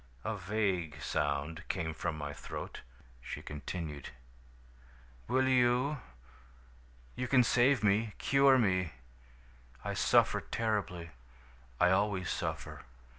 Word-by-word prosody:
A 110 Hz, -, -2 dB
vague 95 Hz, -5 st, -1 dB
sound 75 Hz, +3 st, -1 dB
came 85 Hz, -4 st, -2 dB
from 80 Hz, 0 st, -3 dB
my 75 Hz, -1 st, -4 dB
throat. -, -, -7 dB, 0.4 s
"She -, -, -6 dB
continued: 75 Hz, 0 st, -6 dB, 1.2 s
"'Will 130 Hz, +2 st, +2 dB
you? 130 Hz, +3 st, +3 dB, 1.2 s
You 125 Hz, -, -2 dB
can 125 Hz, 0 st, +5 dB
save 125 Hz, +1 st, +3 dB
me, 105 Hz, +1 st, +2 dB
cure 135 Hz, -1 st, +5 dB
me. 95 Hz, -8 st, +1 dB, 0.9 s
I -, -, -1 dB
suffer -, -, +3 dB
terribly. 100 Hz, -7 st, -2 dB, 0.7 s
I 90 Hz, +1 st, +5 dB
always 95 Hz, -1 st, +1 dB
suffer. -, -, -4 dB
100 Hz, 105 wpm, -32 LUFS, 85-120 Hz, 1.2 s, can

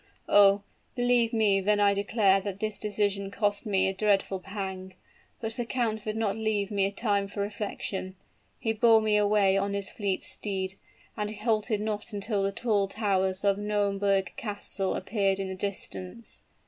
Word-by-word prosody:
"Oh! 200 Hz, 0 st, +6 dB, 0.3 s
believe 245 Hz, -2 st, +3 dB
me 210 Hz, -4 st, +3 dB
when 205 Hz, +2 st, +2 dB
I 200 Hz, -1 st, +4 dB
declare 200 Hz, -1 st, +3 dB
that 200 Hz, 0 st, -5 dB
this 215 Hz, -1 st, -2 dB
decision 205 Hz, -1 st, -1 dB
cost 205 Hz, +1 st, -1 dB
me 190 Hz, -2 st, +2 dB
a 190 Hz, -, 0 dB
dreadful 195 Hz, -1 st, +1 dB
pang; 190 Hz, -1 st, -6 dB, 0.4 s
but 225 Hz, -1 st, -3 dB
the 240 Hz, -, -2 dB
count 225 Hz, -3 st, -2 dB
would 215 Hz, +1 st, -2 dB
not 210 Hz, -3 st, 0 dB
leave 215 Hz, -2 st, -1 dB
me 195 Hz, -1 st, +2 dB
time 200 Hz, -1 st, 0 dB
for 200 Hz, +1 st, -5 dB
reflection. 200 Hz, -2 st, -4 dB, 0.4 s
He 225 Hz, -, -1 dB
bore 225 Hz, 0 st, +5 dB
me 215 Hz, -1 st, +1 dB
away 205 Hz, -2 st, +3 dB
on 200 Hz, 0 st, -1 dB
his 200 Hz, -1 st, -2 dB
fleet 200 Hz, -3 st, -2 dB
steed, 190 Hz, -2 st, -1 dB, 0.4 s
and 210 Hz, -1 st, -2 dB
halted 215 Hz, 0 st, 0 dB
not 215 Hz, +1 st, -3 dB
until 205 Hz, 0 st, -1 dB
the 195 Hz, 0 st, 0 dB
tall 205 Hz, -2 st, 0 dB
towers 190 Hz, -2 st, 0 dB
of 200 Hz, 0 st, +2 dB
Nauemberg 200 Hz, -2 st, 0 dB
Castle 200 Hz, -2 st, -2 dB
appeared 195 Hz, -2 st, 0 dB
in 195 Hz, -1 st, -3 dB
the -, -, -3 dB
distance. 195 Hz, +2 st, -5 dB
205 Hz, 165 wpm, -28 LUFS, 195-215 Hz, 0.4 s, Oh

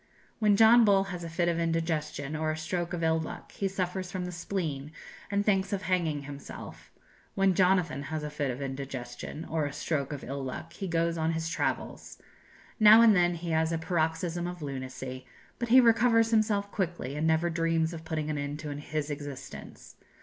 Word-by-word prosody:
When 210 Hz, -2 st, +4 dB
John 225 Hz, +2 st, +7 dB
Bull 200 Hz, -2 st, +5 dB
has 175 Hz, -1 st, -6 dB
a 165 Hz, -, -5 dB
fit 170 Hz, +2 st, 0 dB
of 170 Hz, -1 st, +1 dB
indigestion, 160 Hz, -3 st, -1 dB
or 155 Hz, 0 st, -1 dB
a 155 Hz, -, -1 dB
stroke 175 Hz, +2 st, -3 dB
of 170 Hz, -1 st, -3 dB
ill 160 Hz, 0 st, +3 dB
luck, 160 Hz, -, -7 dB
he 195 Hz, -, -2 dB
suffers 185 Hz, -1 st, -3 dB
from 185 Hz, -2 st, -3 dB
the 180 Hz, -, -5 dB
spleen, 165 Hz, -5 st, -4 dB, 0.4 s
and 200 Hz, 0 st, 0 dB
thinks 195 Hz, -2 st, +2 dB
of 200 Hz, 0 st, -2 dB
hanging 165 Hz, -6 st, 0 dB
himself; 140 Hz, 0 st, -9 dB, 0.4 s
when 195 Hz, -1 st, +3 dB
Jonathan 180 Hz, -6 st, +2 dB
has 155 Hz, -1 st, -3 dB
a 150 Hz, -, -4 dB
fit 145 Hz, -2 st, -2 dB
of 130 Hz, +2 st, -4 dB
indigestion, 135 Hz, +2 st, -6 dB
or 160 Hz, -2 st, -1 dB
a -, -, -5 dB
stroke 140 Hz, -3 st, -2 dB
of 145 Hz, -, -6 dB
ill 135 Hz, +1 st, -4 dB
luck, 135 Hz, +5 st, -6 dB
he 195 Hz, -, -5 dB
goes 165 Hz, -1 st, 0 dB
on 160 Hz, +1 st, +1 dB
his 160 Hz, 0 st, -2 dB
travels. -, -, -3 dB, 0.6 s
Now 215 Hz, +1 st, +9 dB
and 220 Hz, -3 st, +7 dB
then 175 Hz, -1 st, +3 dB
he 170 Hz, 0 st, -5 dB
has 160 Hz, 0 st, +2 dB
a 165 Hz, -, 0 dB
paroxysm 165 Hz, +1 st, -1 dB
of 175 Hz, -3 st, -6 dB
lunacy, 130 Hz, -2 st, -6 dB, 0.3 s
but 240 Hz, -1 st, -2 dB
he 255 Hz, +3 st, +8 dB
recovers 230 Hz, -1 st, +4 dB
himself 210 Hz, -2 st, +2 dB
quickly, 175 Hz, -, -3 dB
and 155 Hz, +2 st, 0 dB
never 160 Hz, +2 st, +2 dB
dreams 165 Hz, 0 st, +1 dB
of 160 Hz, -1 st, -7 dB
putting 155 Hz, -1 st, -2 dB
an 150 Hz, -, -2 dB
end 145 Hz, +1 st, -3 dB
to 150 Hz, -2 st, -4 dB
his 150 Hz, +1 st, -4 dB
existence. 145 Hz, -2 st, -8 dB
165 Hz, 195 wpm, -29 LUFS, 150-185 Hz, 0.6 s, Now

